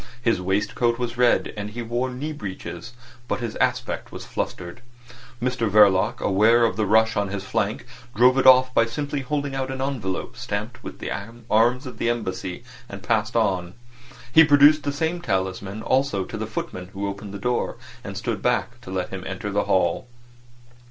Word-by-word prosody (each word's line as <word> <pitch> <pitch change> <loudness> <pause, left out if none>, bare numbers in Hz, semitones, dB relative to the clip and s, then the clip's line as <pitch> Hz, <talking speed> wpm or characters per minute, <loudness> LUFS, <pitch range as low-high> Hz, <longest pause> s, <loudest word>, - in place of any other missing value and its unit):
His 115 -6 +1
waistcoat 105 +5 0
was 120 -1 -3
red, 125 -1 +2
and 105 -1 -4
he 120 +3 -6
wore 120 +3 -1
knee 140 +5 -4
breeches, 110 +1 -7 0.3
but - - -1
his 120 -3 -4
aspect - - -1
was - - -8
flustered. 90 +7 -5 0.6
Mr 125 -2 0
Verloc, 105 +1 +4
aware 110 +4 +4
of 110 - 0
the 110 0 0
rush 110 +1 +4
on 100 -1 0
his 100 0 -4
flank, 105 +3 -2 0.3
drove 125 +4 +5
it 130 - +3
off 130 0 +7
by 115 -1 +4
simply 145 +4 -3
holding 140 +1 -2
out 135 -1 -2
an 135 0 -4
envelope 125 -9 -3
stamped - - -5
with - - -8
the - - -5 0.4
arms 120 +5 +3
of 125 -3 -9
the 115 - +1
Embassy, 95 -4 -3 0.3
and 100 -2 -9
passed 105 +2 0
on. 95 -6 0 0.6
He 160 - +9
produced 150 0 +6
the 145 - -2
same 160 +4 -2
talisman 95 - -2
also 130 -8 +1
to - - -7
the 110 0 -4
footman 90 -4 -5
who 100 +1 -3
opened 100 0 -6
the 100 - -6
door, 125 +4 -1 0.3
and 100 -3 -6
stood 105 -1 -3
back 120 0 0
to 105 - -11
let 95 -1 -2
him 95 -1 -6
enter 95 +2 -4
the 105 +1 0
hall. 85 +3 +1
115 Hz, 185 wpm, -24 LUFS, 100-125 Hz, 0.6 s, He